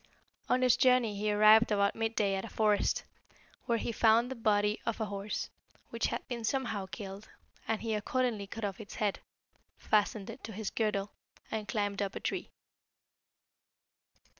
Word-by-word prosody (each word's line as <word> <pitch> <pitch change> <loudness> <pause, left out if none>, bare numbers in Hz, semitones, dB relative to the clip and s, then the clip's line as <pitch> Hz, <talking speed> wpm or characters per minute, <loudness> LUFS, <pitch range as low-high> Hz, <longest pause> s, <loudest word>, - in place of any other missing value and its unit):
"On 255 0 +3
his 250 -2 +5
journey 250 -4 +4
he 210 +1 0
arrived 215 +2 +6
about 200 -1 +2
mid 225 0 -2
day 200 -2 +2
at 190 0 -2
a - - -7
forest, 210 -2 +2 0.6
where 235 -2 +2
he 235 - -2
found 230 +2 +4
the - - -3
body 210 -2 +2
of 230 - -2
a 220 - 0
horse, 200 0 -4 0.4
which - - 0
had - - -4
been 240 -3 -4
somehow 220 -5 -1
killed, 195 +1 -8 0.4
and 225 0 -1
he 225 -1 -1
accordingly 215 -1 -1
cut 220 +2 -5
off 195 +1 -4
its 205 - -10
head, 210 -3 0 0.6
fastened 210 0 +1
it 245 - -12
to 220 - -7
his 210 0 -4
girdle, 210 -2 -1 0.4
and 215 -1 -3
climbed 205 -2 -1
up 200 -1 -2
a - - -3
tree. - - -3
215 Hz, 170 wpm, -31 LUFS, 205-230 Hz, 0.6 s, arrived